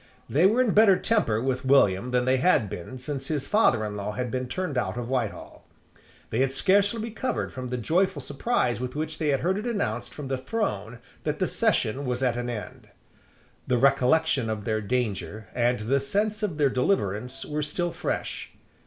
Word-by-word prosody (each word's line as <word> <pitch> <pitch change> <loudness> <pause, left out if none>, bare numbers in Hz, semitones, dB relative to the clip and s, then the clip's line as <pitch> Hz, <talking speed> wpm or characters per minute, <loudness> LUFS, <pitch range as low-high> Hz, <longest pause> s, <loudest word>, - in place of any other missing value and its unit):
They 165 +7 +4
were 230 +5 +3
in 245 -5 +2
better 205 -3 +6
temper 200 - +1
with 130 +2 -1
William 125 -5 +4
than 125 0 +1
they 130 +1 +3
had 130 - +3
been 90 +9 -7
since 135 +1 -5
his 145 -3 -2
father 210 - +3
in 105 -1 -4
law 105 +1 -4
had 125 +1 -3
been 130 +1 -2
turned 180 +1 -3
out 110 -4 -1
of 120 -1 -3
Whitehall. 125 -6 -3 0.7
They 110 - 0
had 135 0 +2
scarcely 200 +9 +2
recovered 230 +3 -3
from 130 -1 -5
the 125 - -2
joyful 165 - +1
surprise 140 - -1
with 125 +1 -4
which 155 +1 -4
they 155 - 0
had 140 -2 +2
heard 190 +4 +1
it 220 - -4
announced 225 -4 -2
from 145 -2 -6
the 130 -1 -2
throne 120 - -3 0.3
that 150 -1 -1
the 185 - 0
session 140 - +1
was 125 -1 -2
at 125 -2 +2
an 120 0 -3
end. 115 -3 -7 0.8
The 125 - +2
recollection 135 0 +3
of 110 -2 -3
their 110 -1 0
danger 110 -2 -2
and 120 -1 +1
the 130 +6 +1
sense 210 +10 -1
of 190 -8 -2
their 145 -3 +3
deliverance 125 - -1
were 150 0 -2
still 175 +4 -2
fresh. - - -4
130 Hz, 195 wpm, -26 LUFS, 120-175 Hz, 0.8 s, better